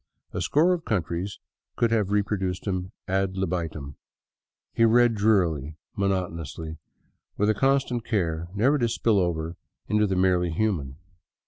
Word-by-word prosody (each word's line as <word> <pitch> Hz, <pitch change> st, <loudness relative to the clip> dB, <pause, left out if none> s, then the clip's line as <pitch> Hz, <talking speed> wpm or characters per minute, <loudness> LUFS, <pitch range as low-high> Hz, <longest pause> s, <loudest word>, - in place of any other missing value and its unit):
A -, -, -2 dB
score 165 Hz, +5 st, +3 dB
of 170 Hz, -2 st, -3 dB
countries 95 Hz, -, -2 dB, 0.4 s
could 115 Hz, -1 st, +2 dB
have 105 Hz, -4 st, +2 dB
reproduced 100 Hz, -3 st, -1 dB
him 95 Hz, -2 st, -2 dB, 0.2 s
ad 95 Hz, 0 st, 0 dB
libitum. 80 Hz, -6 st, -3 dB, 0.8 s
He 115 Hz, -, +2 dB
read 120 Hz, +1 st, +5 dB
drearily, 90 Hz, -9 st, +1 dB, 0.2 s
monotonously, 85 Hz, -5 st, -2 dB, 0.6 s
with 105 Hz, +1 st, +2 dB
constant 135 Hz, -1 st, +1 dB
care 85 Hz, -7 st, -1 dB
never 135 Hz, +8 st, +3 dB
to 120 Hz, -2 st, +1 dB
spill 115 Hz, -2 st, +2 dB
over 85 Hz, -2 st, -1 dB, 0.3 s
into 105 Hz, 0 st, +2 dB
the 95 Hz, -, 0 dB
merely 90 Hz, -1 st, +2 dB
human. 80 Hz, -7 st, -1 dB
95 Hz, 130 wpm, -26 LUFS, 85-110 Hz, 0.8 s, read